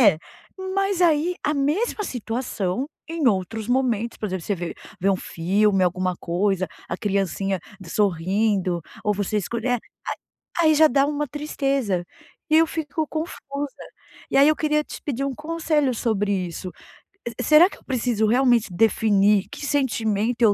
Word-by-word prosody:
É, 200 Hz, -10 st, +6 dB, 0.6 s
mas 390 Hz, -1 st, +1 dB
aí 340 Hz, 0 st, +3 dB
a 300 Hz, 0 st, +1 dB
mesma 325 Hz, +11 st, 0 dB
situação, 235 Hz, -, -2 dB, 0.2 s
em 325 Hz, -4 st, -1 dB
outros 215 Hz, +3 st, -2 dB
momentos, 240 Hz, -3 st, 0 dB
por 215 Hz, -, -2 dB
exemplo, 185 Hz, -3 st, -4 dB
você 205 Hz, -, 0 dB
vê 175 Hz, -1 st, -5 dB, 0.3 s
vê 195 Hz, +3 st, +3 dB
um 190 Hz, -, +2 dB
filme, 195 Hz, +4 st, +1 dB
alguma 185 Hz, +1 st, 0 dB
coisa, 185 Hz, +2 st, 0 dB, 0.2 s
a -, -, -2 dB
criancinha 195 Hz, -1 st, -1 dB, 0.2 s
d 185 Hz, -, -11 dB
sorrindo 190 Hz, 0 st, +1 dB, 0.2 s
ou 210 Hz, -, +2 dB
você 205 Hz, +1 st, -1 dB
escolhe 235 Hz, +4 st, -3 dB
eh, 245 Hz, -1 st, +2 dB, 0.8 s
a 340 Hz, -, +3 dB
aí 310 Hz, -1 st, +6 dB
já 310 Hz, +1 st, +6 dB
dá 275 Hz, +1 st, +3 dB
uma 295 Hz, 0 st, -1 dB
tristeza, 275 Hz, -, -1 dB, 0.5 s
e 310 Hz, -, +5 dB
eu 325 Hz, 0 st, +5 dB
fico 315 Hz, -1 st, -3 dB
confusa. 290 Hz, -3 st, -5 dB, 0.5 s
E -, -, +3 dB
aí 280 Hz, +2 st, +7 dB
eu 310 Hz, -, +4 dB
queria 300 Hz, 0 st, +1 dB
te -, -, -9 dB
pedir 275 Hz, -2 st, -2 dB
um 270 Hz, -2 st, -3 dB
conselho 305 Hz, -3 st, 0 dB
sobre 210 Hz, -4 st, 0 dB, 0.2 s
isso, 180 Hz, +2 st, -6 dB, 0.7 s
será 310 Hz, -, +6 dB
que -, -, -12 dB
eu -, -, -22 dB
preciso 240 Hz, -4 st, 0 dB
realmente 240 Hz, -2 st, +3 dB
definir 205 Hz, 0 st, +3 dB
que -, -, -6 dB
sentimento 235 Hz, -5 st, 0 dB
eu 215 Hz, -3 st, +6 dB
235 Hz, 160 wpm, -23 LUFS, 195-290 Hz, 0.8 s, aí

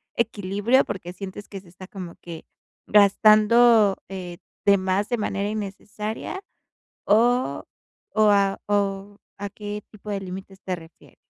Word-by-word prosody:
equilibrio, 215 Hz, +3 st, +1 dB
porque 180 Hz, -3 st, -6 dB
sientes 195 Hz, +2 st, -8 dB
que 195 Hz, -2 st, -8 dB
se 185 Hz, -, -19 dB
está 185 Hz, +2 st, -12 dB
como 185 Hz, -4 st, -8 dB
que 170 Hz, -2 st, -9 dB, 0.4 s
gastando, 215 Hz, +1 st, +5 dB
eh, 180 Hz, -2 st, -7 dB, 0.3 s
de 200 Hz, 0 st, +6 dB
más 190 Hz, +2 st, 0 dB
de 240 Hz, -, 0 dB
manera 200 Hz, -1 st, -2 dB
innecesaria, 210 Hz, -, -5 dB, 0.6 s
o 240 Hz, +4 st, +2 dB, 0.5 s
o 215 Hz, -1 st, +5 dB
a 200 Hz, -1 st, +2 dB
o, 200 Hz, 0 st, -1 dB, 0.2 s
¿a 200 Hz, +1 st, -4 dB
qué 210 Hz, 0 st, -6 dB
tipo 210 Hz, 0 st, -10 dB
de 200 Hz, -1 st, -2 dB
límites 190 Hz, +1 st, -8 dB
te 185 Hz, -1 st, -3 dB
refieres? 165 Hz, -1 st, -17 dB
200 Hz, 140 wpm, -24 LUFS, 190-215 Hz, 0.6 s, de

